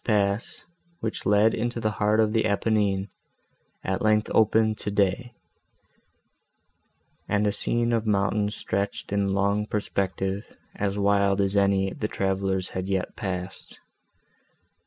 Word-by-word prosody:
This - - -20
pass, 100 -1 0 0.3
which 110 -1 -3
led 105 +2 +4
into 120 +1 -2
the 110 -2 0
heart 105 +1 +1
of 110 -1 +3
the 110 0 +1
Apennine, 100 -2 0 0.7
at 95 0 -2
length 110 0 +2
opened 110 0 +3
to - - -2
day, 105 +5 0 1.9
and 105 0 +2
a 105 - +2
scene 120 +3 +1
of 115 -1 0
mountains 105 0 +1
stretched 100 0 -3
in 100 -1 +1
long 100 +1 +1
perspective, 95 -1 -3 0.2
as 100 0 -2
wild 100 0 +2
as 100 0 +1
any 100 -1 +2
the 105 - -3
travellers 95 -2 -1
had 95 +1 -4
yet 95 -2 -2
passed. 95 -1 -5
100 Hz, 135 wpm, -26 LUFS, 100-110 Hz, 1.9 s, led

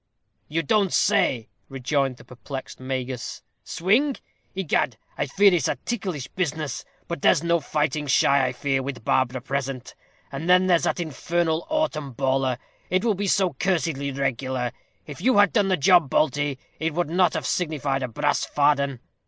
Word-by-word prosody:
"You 165 +2 -1
don't 200 +3 +2
say," 115 -4 +2 0.2
rejoined 135 0 -1
the - - -14
perplexed 130 +2 -8
Magus, 130 -1 -4 0.2
"swing! 240 - +1 0.4
Egad 155 - 0 0.2
I - - -2
fear 195 +7 +5
it's 170 -7 +2
a - - 0
ticklish 185 - -3
business. 155 -6 -3 0.2
But 170 -4 -4
there's 150 - +4
no 170 0 +2
fighting 150 0 -1
shy, 135 0 +4
I - - -1
fear, 135 +1 -1
with 130 -4 -6
Barbara 130 -1 +1
present; 135 -1 -4 0.4
and 150 +5 -4
then 180 +1 +6
there's 175 -3 +3
that - - 0
infernal 165 +1 -1
autem 165 - -1
bawler; 130 -2 +1 0.3
it 185 +5 +1
will 225 - +3
be 200 +1 -2
so 190 -2 +2
cursedly 165 -7 -1
regular. 130 -2 -2 0.3
If 150 +2 -9
you 250 +2 +3
had 205 0 +5
done 205 -4 +3
the 185 -1 +2
job, 175 -1 +5
Balty, 145 -2 +1 0.2
it 160 -1 -2
would 175 -2 -1
not 180 -2 +3
have - - -2
signified 145 -5 -1
a 130 - -1
brass 145 +5 0
farden. 140 -3 +1
150 Hz, 165 wpm, -24 LUFS, 135-180 Hz, 0.4 s, then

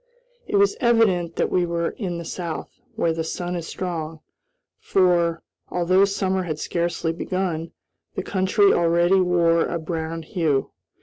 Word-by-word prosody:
It - - -2
was 200 0 +4
evident 210 -9 +2
that - - 0
we 180 - +2
were 170 -1 -1
in 180 -6 -4
the 170 - -6
South, 170 -1 -5 0.2
where 170 -7 +1
the 165 0 -2
sun 175 +2 -4
is 170 -2 -4
strong, 165 -3 -4 0.6
for, 175 -3 +2 0.3
although 185 +2 +3
summer 190 -1 0
had 160 -4 -3
scarcely 170 0 -1
begun, 170 -2 -3 0.4
the - - -2
country 195 +1 +3
already 175 +2 +3
wore 170 -2 +3
a 170 - -2
brown 165 0 -4
hue. 155 -4 0
175 Hz, 145 wpm, -23 LUFS, 165-185 Hz, 0.6 s, was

